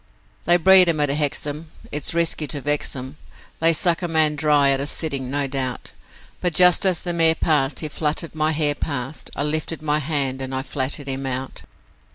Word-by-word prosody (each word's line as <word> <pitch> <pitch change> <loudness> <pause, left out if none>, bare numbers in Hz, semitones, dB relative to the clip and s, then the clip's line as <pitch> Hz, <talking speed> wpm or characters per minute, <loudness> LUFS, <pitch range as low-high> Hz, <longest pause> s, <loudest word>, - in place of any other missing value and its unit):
'They 175 +1 +5
breed 185 0 +6
'em 160 -2 0
at 145 -1 +1
Hexham, 150 +2 -3 0.2
it's 150 +2 -3
risky 165 -2 0
to 145 +2 -3
vex 145 +1 -2
'em, 130 +3 -7 0.4
They 165 +1 +6
suck 170 +1 +1
a 175 - -2
man 160 -2 +2
dry 145 -2 +3
at 135 - +1
a 140 - -2
sitting, 140 -5 -3
no 140 +1 -1
doubt, 130 -2 -4 0.5
But 175 -3 -1
just 180 +2 +6
as 180 -3 +1
the 175 - -3
mare 165 -1 +3
passed, 150 -4 0
he 155 - -2
fluttered 150 +2 -3
my 155 0 0
hair 150 -2 +1
past, 140 -1 -5
I - - -2
lifted 155 +1 -2
my 150 0 +1
hand, 135 -3 -2
and 130 0 -4
I 130 - -3
flattened 140 +1 -3
him 135 0 -3
out. 130 0 -6
150 Hz, 200 wpm, -21 LUFS, 140-160 Hz, 0.5 s, breed